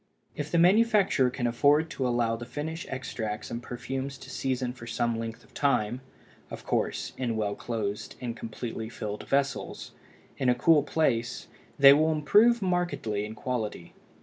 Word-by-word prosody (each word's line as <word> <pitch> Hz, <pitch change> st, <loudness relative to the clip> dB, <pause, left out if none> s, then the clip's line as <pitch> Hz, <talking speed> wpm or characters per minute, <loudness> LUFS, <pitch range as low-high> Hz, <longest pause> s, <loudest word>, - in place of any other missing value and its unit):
If 150 Hz, 0 st, -4 dB
the 170 Hz, -, +1 dB
manufacturer 195 Hz, -, +4 dB
can 125 Hz, 0 st, -3 dB
afford 145 Hz, +6 st, +3 dB
to 130 Hz, -, -1 dB
allow 120 Hz, -2 st, +1 dB
the 115 Hz, -, -7 dB
finished 150 Hz, +7 st, -5 dB
extracts 110 Hz, -5 st, -4 dB
and 115 Hz, -, -4 dB
perfumes 130 Hz, +3 st, -5 dB
to 130 Hz, 0 st, -11 dB
season 130 Hz, -2 st, -2 dB
for 120 Hz, -2 st, -11 dB
some 120 Hz, -1 st, -1 dB
length 115 Hz, 0 st, -6 dB
of -, -, -23 dB
time—of 130 Hz, -2 st, -3 dB
course, -, -, -1 dB
in 120 Hz, -3 st, -1 dB
well 105 Hz, -2 st, 0 dB
closed 105 Hz, -2 st, -4 dB
and 120 Hz, -2 st, -4 dB
completely 115 Hz, -1 st, -6 dB
filled 105 Hz, -3 st, -6 dB
vessels—in 140 Hz, -1 st, -3 dB
a 125 Hz, -, +4 dB
cool 150 Hz, +5 st, +5 dB
place, 135 Hz, -6 st, -1 dB, 0.3 s
they 140 Hz, 0 st, +9 dB
will 155 Hz, +2 st, +3 dB
improve 210 Hz, +10 st, +4 dB
markedly 175 Hz, -, -1 dB
in 110 Hz, +1 st, -7 dB
quality. 110 Hz, -7 st, -4 dB
125 Hz, 150 wpm, -28 LUFS, 115-145 Hz, 0.3 s, they